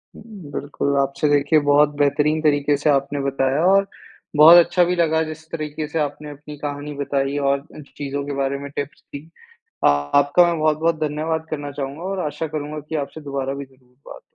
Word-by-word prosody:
हुँ, 205 -9 -12
बिल्कुल 140 0 -2
आपसे 140 +2 0
देखिए 145 +2 +3
बहुत 145 +1 +5
बेहतरीन 150 +2 +2
तरीके 145 -1 +2
से 150 +2 0
आपने 140 0 +1
बताया 135 +2 0
और 195 +1 +4 0.5
बहुत 165 +3 +10
अच्छा 180 - +2
भी 180 +1 0
लगा 160 -2 +2
जिस 155 0 -8
तरीके 155 -1 -4
से 160 +1 -3
आपने 150 0 -3
अपनी 150 +1 -10
कहानी 145 0 -5
बताई 140 0 -1
और 140 0 +1
अ, 145 - -15
च 140 - -15
चीज़ों 140 0 -4
के 145 - -4
बारे 140 0 -1
में 140 0 -7
टिप्स 145 0 -5
दी। 145 +3 -9 0.6
आ - - +7 0.3
आपका 145 +5 +4
मैं 170 -2 0
बहुत-बहुत 155 +1 +1
धन्यवाद 155 +1 -2
करना 145 -2 -4
चाहूँगा 140 +2 -6
और 190 0 -3
आशा 150 +2 -4
करूँगा 150 0 -5
की 160 - -2
आपसे 160 - -12
दोबारा 140 -2 -4
भी 140 0 -6
ज़रूर 130 -1 -26 0.2
बात - - -9
हो। - - -13
145 Hz, 200 wpm, -21 LUFS, 140-155 Hz, 0.6 s, बहुत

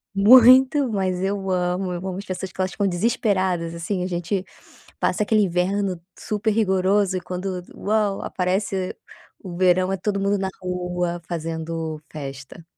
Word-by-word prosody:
muito 255 +6 +7
mas 190 -3 -1
eu 195 0 -2
amo 180 0 0
eu 180 +2 -4
amo 185 -1 -4
as 200 - -8
pessoas 185 0 -5
que 190 - -4
elas 185 - 0
ficam 200 +2 0
desesperadas, 185 -4 0
assim, 180 +2 -3
a - - -2
gente 180 +2 -2 0.5
passa - - 0
aquele 215 0 +3
inverno 185 0 0 0.2
super 210 +1 -1
rigoroso 195 -2 +2
e - - -7
quando, 185 0 -4
uau, 210 -1 0
aparece 185 0 -2 0.5
o 180 -2 -7
verão 185 +1 +3
é 195 - -2
todo 200 +1 -1
mundo 200 +1 +1
na 190 0 -1
rua 180 -1 -2
fazendo 160 -1 -4
festa. 140 +2 -8
185 Hz, 155 wpm, -23 LUFS, 180-200 Hz, 0.5 s, muito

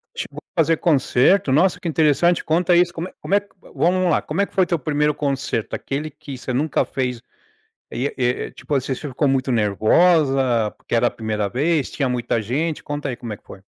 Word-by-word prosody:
Tipo, - - -6 0.2
fazer 165 -1 +3
concerto? 150 +2 +3
Nossa 175 +7 +3
que - - -5
interessante, 160 +2 +2
conta 175 +2 +2
isso, 175 0 +4
como 170 +2 -4
é - - -13
como 195 - 0
é, 205 0 0 0.3
vamos 185 +1 +2
lá, - - +2
como 160 +6 -2
é - - +3
que - - -20
foi 190 - +3
teu 175 -2 -1
primeiro 150 +1 +1
concerto? 140 -6 -2
Aquele 145 +3 -4
que 140 -1 -10
você 130 - -5
nunca 145 +4 +1
fez, 125 -3 -3 0.7
e 130 +4 -2
e 125 -1 -1
tipo, 150 - -5
assim, 135 0 0
você 145 - -7
ficou 140 +3 -1
muito 135 -1 0
nervosa, 125 - +3
porque - - -6
era 120 +1 +3
a - - -10
primeira 105 -2 -3
vez, 145 +5 0
tinha 140 -3 -1
muita 120 -2 -1
gente, 145 +9 -2
conta 145 -1 -4
aí 125 - -3
como 120 -2 -7
é - - -5
que - - -32
foi. 95 - -12
140 Hz, 210 wpm, -21 LUFS, 125-165 Hz, 0.7 s, isso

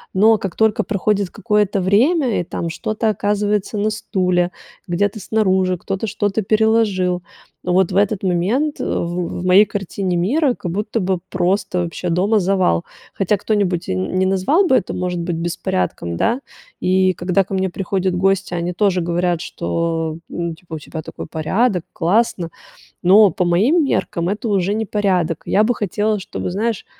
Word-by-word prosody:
Но 220 +3 +5
как 190 -4 -4
только 220 0 +2
проходит 200 -1 0
какое-то 210 -3 0
время 245 - +2
и - - -4
там 170 0 -4
что-то 215 +6 -2
оказывается 205 0 0
на 215 +1 +1
стуле, 180 -4 0 0.4
где-то 205 +4 0
снаружи, 190 -4 +1
кто-то 195 +5 -3
что-то 205 +1 -1
переложил, 210 -4 +2 0.4
вот 180 0 +2
в - - -3
этот 205 -1 +1
момент, 205 - 0
в - - -2 0.4
в 175 - -3
в - - -5
моей 190 +3 +6
картине 195 -2 -3
мира, 260 - +2
как 175 - -5
будто 210 +4 -2
бы 185 -2 0
просто 185 0 0
вообще 175 +1 -4
дома 200 +6 +2
завал. 185 - +1 0.3
Хотя 195 +1 +1
кто-нибудь 190 -4 0
н 95 0 -1
не 190 - +3
назвал 195 - +2
бы 265 - +3
это, - - 0
может 180 -1 -2
быть, 170 0 -2
беспорядком, 90 - -2
да. 240 - +1 0.4
И 185 0 +2
когда 185 +3 +1
ко 195 - -9
мне 190 -1 0
приходят 190 0 -1
гости, 195 0 +1
они 175 +1 -2
тоже 185 -2 +1
говорят, 175 0 0
что, 165 -2 -2
ну, 170 -1 -3
типа, 165 -1 -10
у - - -5
тебя 160 +2 -7
такой - - -8
порядок, 180 +5 0
классно, 180 -1 +1 0.5
но 195 +1 +6
по 180 - -1
моим 230 - +3
меркам 175 -9 -1
это 210 +2 -2
уже 195 0 +1
не 220 0 -1
порядок. 185 -6 0
Я 210 - +3
бы 245 +2 +2
хотела, 210 +1 -1
чтобы, 180 - -5
знаешь, 220 +2 -2
190 Hz, 165 wpm, -19 LUFS, 175-210 Hz, 0.5 s, моей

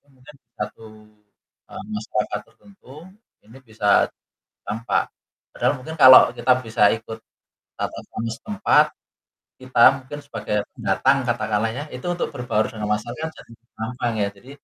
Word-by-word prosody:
mungkin 135 +3 -17
di - - -67 0.2
satu, 115 - -6 0.8
eee, - - -8
masyarakat 105 0 -2
tertentu, 195 -10 -20 0.5
ini 115 +5 -16
bisa 105 -2 +3 0.6
tampak. 115 +2 -1 0.4
Padahal - - +1
mungkin 160 +5 -8
kalau 130 0 +11 0.2
kita 120 +2 +3
bisa 110 -2 -2
ikut 110 0 -7 0.6
tata - - -4
krama 115 +1 -4
setempat, 155 - +2 0.7
kita 130 -2 +1 0.2
mungkin 130 +3 -9
sebagai 140 -7 -4 0.2
pendatang, 130 +8 +2
katakanlah 110 -1 0
ya, 145 +4 -5
itu 125 +6 -7
untuk 175 - -2
berbaur 120 -4 0
dengan 105 -2 -5
masyarakat 120 +9 -5
jadi - - -15 0.2
gampang 120 +1 -3
ya, 100 - +1
jadi 125 +7 -16
120 Hz, 135 wpm, -22 LUFS, 110-130 Hz, 0.8 s, kalau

